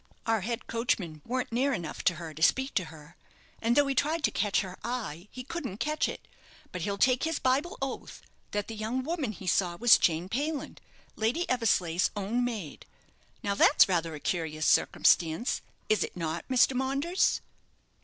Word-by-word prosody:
Our 225 -2 +1
head 235 +4 -3
coachman 185 -9 -2
warn't 255 +1 -2
near 265 +4 +1
enough 170 -9 -5
to 175 - +4
her 160 -1 -7
to 155 - -11
speak 265 +10 +3
to 185 - 0
her; 160 0 -13 0.5
and 230 +1 +2
though 290 0 +5
he 275 - 0
tried 310 +4 0
to - - +3
catch 205 -3 +1
her 185 -2 -7
eye 210 -8 -4
he 255 - -8
couldn't 260 - -5
catch 305 +6 0
it; - - -8 0.4
but 180 - -5
he'll 200 +4 -2
take 255 +4 +3
his 325 -1 0
Bible 285 - 0
oath - - -6 0.3
that 205 -1 -2
the 225 - -6
young 220 +4 -2
woman 305 -5 -2
he 195 -2 -10
saw 180 -1 +1
was 240 +3 +7
Jane 165 +1 +1
Payland, 285 +8 -3 0.4
Lady 240 +11 0
Eversleigh's 185 -8 +2
own 210 +5 -1
maid. 215 -11 -5 0.6
Now, 200 - 0
that's - - +6
rather 165 -4 0
a - - -8
curious 155 -2 -2
circumstance, 165 +8 +3 0.3
is 215 - +2
it - - -7
not, 165 0 -3
Mr. 260 +1 +4
Maunders?" 275 +8 +1
225 Hz, 180 wpm, -29 LUFS, 175-260 Hz, 0.6 s, was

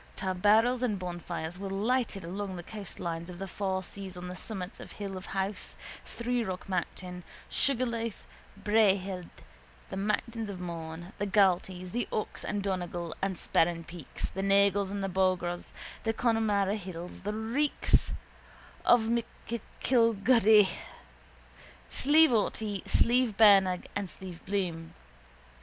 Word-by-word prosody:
Tarbarrels 210 +6 +3
and 225 -5 +1
bonfires 175 -1 -5
were 195 0 -4
lighted 210 0 0
along 190 +3 -4
the 175 - -6
coastline 170 -5 -5
of 180 - -8
the 195 +1 -5
four 190 0 -2
seas 190 -1 -8
on 180 0 -6
the 180 - -6
summits 185 -1 -6
of - - -9
the - - -12
Hill 200 -2 -5
of 185 +1 -7
Howth, 195 0 -3 0.3
Three 245 0 -1
Rock 185 -2 -5
Mountain, 180 -1 -3 0.2
Sugarloaf, 235 -4 0 0.3
Bray 210 0 +4
Head, 185 -2 -6 0.6
the - - -4
mountains 215 +2 -1
of 190 -2 -6
Mourne, 170 +1 -6
the 205 - 0
Galtees, 185 -2 +2
the 240 +1 -1
Ox 215 - -3
and 205 -1 -2
Donegal 175 -3 -3
and 195 -1 0
Sperrin 165 0 +1
peaks, 170 -3 -6
the 195 - -3
Nagles 200 0 +4
and 200 0 -3
the - - 0
Bograghs, 185 -2 0 0.3
the 225 - +1
Connemara 220 -4 +2
hills, 180 -3 -7
the 205 - -2
reeks 235 +7 +1 0.7
of 240 -1 +6
M'Gillicuddy, 230 -1 +3 1.2
Slieve 310 +1 +5
Aughty, 210 -2 0
Slieve 240 -3 +3
Bernagh 195 -4 +6
and 205 -1 -1
Slieve 180 0 -9
Bloom. 175 -5 -2
195 Hz, 135 wpm, -30 LUFS, 180-220 Hz, 1.2 s, of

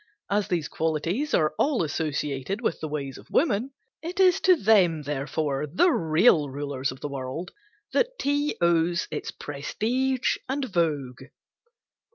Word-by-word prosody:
As 205 0 +1
these 170 -4 -1
qualities 165 - -1
are 155 -1 +2
all 280 - +2
associated 150 +2 -2
with 225 -8 -1
the 155 - -4
ways 140 -3 -5
of - - -17
women, 250 -4 +1 0.3
it 355 +4 -6
is 375 0 +5
to 370 -1 +6
them, 190 - +3
therefore 145 0 -2
the 350 - +4
real 160 - +3
rulers 140 -1 -3
of 130 - -11
the - - -3
world 140 +5 -5 0.4
that - - +1
tea 290 - 0
owes 170 0 +2
its 155 - -4
prestige 245 - -1
and 275 +1 -1
vogue. 150 - -1
165 Hz, 145 wpm, -26 LUFS, -, 0.4 s, to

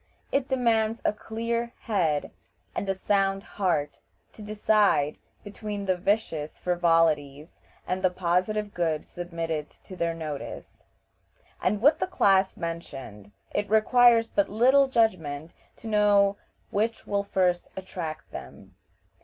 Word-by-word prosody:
It 275 -1 +1
demands 230 -4 +1
a - - +3
clear 230 +2 -3
head 165 -10 0 0.4
and 200 - -3
a 195 - +1
sound 195 0 +1
heart 165 -9 -1 0.3
to - - -12
decide 210 -7 +2 0.2
between 205 0 -6
the 185 -1 +2
vicious 175 -5 -1
frivolities 165 -4 +1 0.3
and 185 +1 -1
the 185 - +4
positive 185 +4 -1
good 160 -3 -1
submitted 165 -3 -4
to 185 - -13
their 170 -2 -1
notice, 155 -3 -7 0.8
and 205 +3 0
with 295 +3 +5
the - - 0
class 195 - +3
mentioned 135 -11 -7 0.2
it 205 0 -2
requires 230 +1 +5
but 200 - 0
little 260 +6 +4
judgment 170 - 0 0.2
to - - -17
know 205 -2 +4 0.4
which 220 +3 -1
will 200 0 0
first 180 -3 0
attract 175 -4 -6
them. - - -10
195 Hz, 125 wpm, -27 LUFS, 165-215 Hz, 0.8 s, with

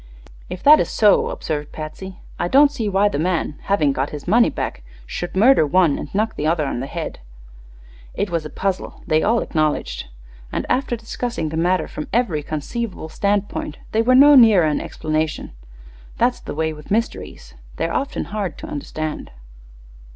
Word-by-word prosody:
"If 180 - -7
that 300 +2 +8
is - - 0
so," 210 -3 +3
observed 150 -2 -4
Patsy, 180 +5 -8 0.2
"I 175 - 0
don't 280 +8 +5
see 230 -7 -2
why 200 +1 +3
the 145 - -2
man, 165 -3 -1
having 155 -8 +2
got 135 +1 -1
his 150 +1 -8
money 230 +5 +5
back, - - -4 0.2
should 175 - -5
murder 225 0 +5
one 155 0 +2
and 145 - -8
knock 220 +2 0
the 150 - -2
other 160 -2 +1
on 135 - -3
the 135 - -4
head." - - -5 1.0
It 200 - -2
way 170 - +1
a 150 - -7
puzzle, 190 +2 -3
they 155 0 +2
all 230 +2 +2
acknowledged, 155 -2 -1 0.4
and - - -2
after 255 -2 0
discussing 230 -6 -4
the 160 - -5
matter 180 +3 +1
from 150 - -7
every 210 -10 +1
conceivable 160 +5 -5
standpoint 200 -4 -2
they 220 - +2
were 255 +3 +4
no 285 +3 +8
nearer 220 - +7
an 150 -1 0
explanation. 155 0 -3 0.7
That's - - +1
the - - -7
way 160 0 -1
with 150 -1 -13
mysteries; 225 +3 -3 0.2
they're - - -2
often 275 - -2
hard 200 -7 -3
to - - -8
understand. 155 +1 -5
180 Hz, 175 wpm, -21 LUFS, 155-220 Hz, 1.0 s, that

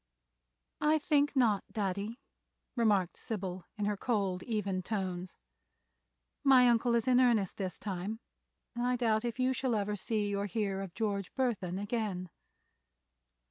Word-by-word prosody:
"I 305 +1 +4
think 290 -1 +2
not, 220 -7 +3
Daddy," 200 +2 -2 0.6
remarked 205 -7 +2
Sybil, 190 -4 -5
in 205 - -1
her 210 0 +1
cold, 195 -4 -1
even 200 -4 -1
tones. 185 -3 -3 1.1
"My 260 -3 +7
uncle 235 0 +3
is 230 0 +1
in 250 -1 +5
earnest 230 -7 +3
this 185 -4 -3
time 200 +2 -4 0.5
and 240 0 -2
I 250 0 +2
doubt 225 -2 +1
if 240 -1 -3
you 255 0 +2 0.2
ever 205 0 -1
see 205 0 -1
or 200 +1 -1
hear 200 -2 -1
of 190 -3 -7
George 200 -4 -1
Burthon 210 -9 -1
again." 200 -4 -2
210 Hz, 140 wpm, -32 LUFS, 195-240 Hz, 1.1 s, My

